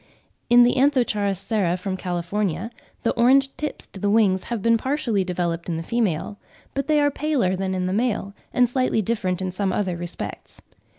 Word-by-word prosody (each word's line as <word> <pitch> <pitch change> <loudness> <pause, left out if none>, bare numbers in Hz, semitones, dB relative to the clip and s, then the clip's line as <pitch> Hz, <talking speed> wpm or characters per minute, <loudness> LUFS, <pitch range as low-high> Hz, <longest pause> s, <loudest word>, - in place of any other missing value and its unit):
In 240 0 +8
the 245 - +3
Anth. 240 -8 +2
sara 195 -3 0
from 185 +1 -3
California, 185 +3 -2 0.3
the - - +2
orange 270 +3 +3
tips 300 - -5
to 195 - -12
the 205 - 0
wings 200 -3 +3
have 235 -2 -3
been 230 0 +4
partially 240 -5 0
developed 175 -2 -2
in 165 - -1
the 165 - -4
female; 205 -2 -1 0.3
but 275 0 -2
they 305 -1 +3
are 290 0 +3
paler 280 -11 0
than 190 0 -2
in 185 0 -1
the 185 - -1
male, 215 -3 -1 0.2
and 250 -1 +3
slightly 245 -3 +1
different 190 -4 -1
in 185 - -2
some 190 +1 -1
other 185 -2 -1
respects. 175 0 -7
205 Hz, 185 wpm, -23 LUFS, 185-245 Hz, 0.3 s, In